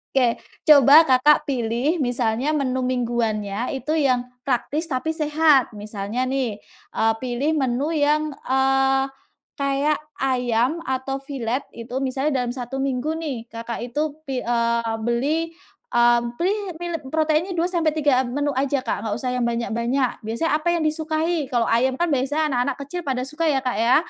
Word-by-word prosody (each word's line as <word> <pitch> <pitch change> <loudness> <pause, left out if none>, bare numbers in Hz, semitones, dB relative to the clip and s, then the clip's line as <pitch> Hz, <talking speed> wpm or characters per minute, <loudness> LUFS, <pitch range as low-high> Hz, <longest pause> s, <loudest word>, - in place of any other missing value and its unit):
Oke. 245 -3 +3 0.3
Coba 290 +1 +8
Kakak 265 +3 +5
pilih 250 +5 0
misalnya 245 +1 0
menu 260 -3 0
mingguannya 235 -3 -1
itu 270 +3 -4
yang 250 -3 +1 0.2
praktis 280 +5 0
tapi 295 +2 -1
sehat. 300 -3 +3
Misalnya 210 +3 -4
nih, 255 -6 -2 0.3
eee, 225 0 +2
pilih 255 +4 0
menu 265 +1 0
yang, 305 +1 +2 0.2
eee, 270 0 +2 0.5
kayak 280 +1 +1 0.2
ayam 255 +4 0
atau 265 -1 -2
filet 265 -1 -3
itu. 235 +2 -8
Misalnya 270 0 0
dalam 240 - -2
1 245 +1 -6
minggu 270 +3 -1
nih 275 -8 -5
Kakak 230 +1 -5
itu 295 +5 -1 0.2
pi 260 -2 -2
eee, 235 -1 0
beli, 280 +8 0 0.5
eee, 240 0 +5 0.2
pilih 385 +5 +1 0.2
beli 345 -3 -4
proteinnya 315 +3 +1
2 340 +1 +1
sampai 330 -3 +1
3 285 -4 +3
menu 285 +4 -1
aja, 275 +1 +1
Kak, 205 - -2
nggak 215 -2 -2
usah 250 0 -2
yang 250 - 0
banyak-banyak. 235 +2 -1
Biasanya 235 +9 -1
apa 310 - -5
yang - - -1
disukai, 315 0 -1
kalau 235 -2 +1
ayam 255 +3 +2
kan 345 - +2
biasanya 290 +3 0
anak-anak 245 -1 0
kecil 355 +5 -4
pada 255 -2 0
suka 310 +4 -2
ya, 285 -3 +2
Kak, 250 -1 -1
ya. 235 +2 +4
265 Hz, 155 wpm, -23 LUFS, 240-300 Hz, 0.5 s, Coba